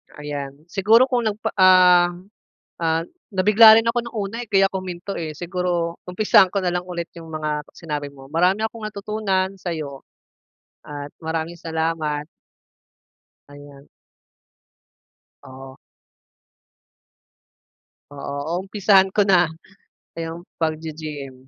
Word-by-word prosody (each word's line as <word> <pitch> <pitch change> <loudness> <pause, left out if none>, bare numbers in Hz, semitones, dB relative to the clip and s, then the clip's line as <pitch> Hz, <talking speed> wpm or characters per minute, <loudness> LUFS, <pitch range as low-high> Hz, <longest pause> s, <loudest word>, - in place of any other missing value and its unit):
Ayan 145 0 -7
siguro 215 +5 +5
kung 240 -3 +1
nagpa 215 0 -2
ah 180 -1 +7 0.7
ah, 165 -1 0 0.3
nabigla 215 +3 +7
rin 225 - -8
ako 235 +1 +1
ng 235 - -10
una, 205 +1 -3
eh, 225 - -25
kaya 195 -1 +4
ko 190 - -2
huminto, 180 +1 -6
eh. 160 -2 -4
Siguro 175 -1 -2
umpisahan 190 0 +4
ko 200 - 0
na 180 -2 -1
lang 180 0 -2
ulit 175 -2 -5
'yung 165 -1 -10
mga 150 -1 -3
sinabi 145 -3 -5
mo, 135 -1 -14
marami 180 +6 +2
akong 220 -1 -9
natutunan 200 -2 -2
sa'yo. 155 -7 -6 0.8
At 145 -1 -7
maraming 160 +1 -3
salamat. 160 -2 -2 1.2
Ayan. 145 -1 -14 1.6
Oo. 130 0 -12 2.4
Oo, 140 0 -5 0.2
uumpisahan 195 0 +3
ko 210 - +4
na 185 - +6 0.8
'yung 165 +1 -5 0.2
pagge-gym. 155 -3 -4
170 Hz, 115 wpm, -22 LUFS, 150-195 Hz, 2.4 s, ah